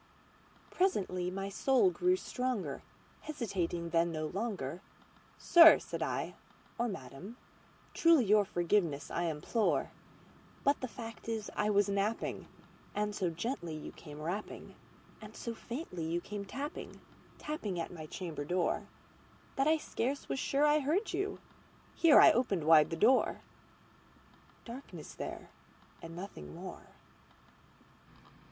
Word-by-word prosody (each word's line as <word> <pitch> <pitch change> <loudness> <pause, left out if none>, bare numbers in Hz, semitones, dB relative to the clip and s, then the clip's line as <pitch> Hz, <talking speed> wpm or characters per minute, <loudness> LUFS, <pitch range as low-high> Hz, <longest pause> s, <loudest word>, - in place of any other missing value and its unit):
Presently 185 - 0
my 195 +1 -4
soul 265 - +3
grew 360 +1 +2
stronger; 250 - -3 0.4
hesitating 180 - -3
then 170 0 +2
no 155 -1 -3
longer,"Sir," 200 - +3
said - - -6
I, - - -2 0.5
"or 240 - +2
Madam, 190 - -8 0.6
truly 330 -7 +5
your 210 +1 +5
forgiveness 175 -5 0
I 175 - -1
implore; 165 +8 0 0.7
But 280 +1 +2
the 255 - -2
fact 230 -1 -8
is 220 -2 -3
I 210 - +1
was 205 -1 +3
napping, 200 +3 -1 0.5
and 210 0 0
so 185 -3 0
gently 170 - -4
you 155 - -7
came 150 -2 -11
rapping, 175 +7 -5 0.5
And 215 0 -11
so 235 - -5
faintly 230 - -6
you 165 +2 0
came 205 +2 -6
tapping, 275 +10 -6 0.4
tapping 215 - -4
at 165 - -4
my 155 -3 -8
chamber 165 -3 -5
door, 175 +4 0 0.7
That 270 +1 +2
I 320 +1 +5
scarce 275 -2 -3
was - - -2
sure 280 +3 +2
I 300 +1 +4
heard 330 +10 0
you"—here 370 -4 +1
I - - +9
opened 205 -9 +1
wide 155 -1 +6
the 165 - -3
door:—Darkness 235 - -3
there - - -7 0.5
and 165 0 -9
nothing 170 - -8
more. - - -9
205 Hz, 125 wpm, -33 LUFS, 170-260 Hz, 0.7 s, I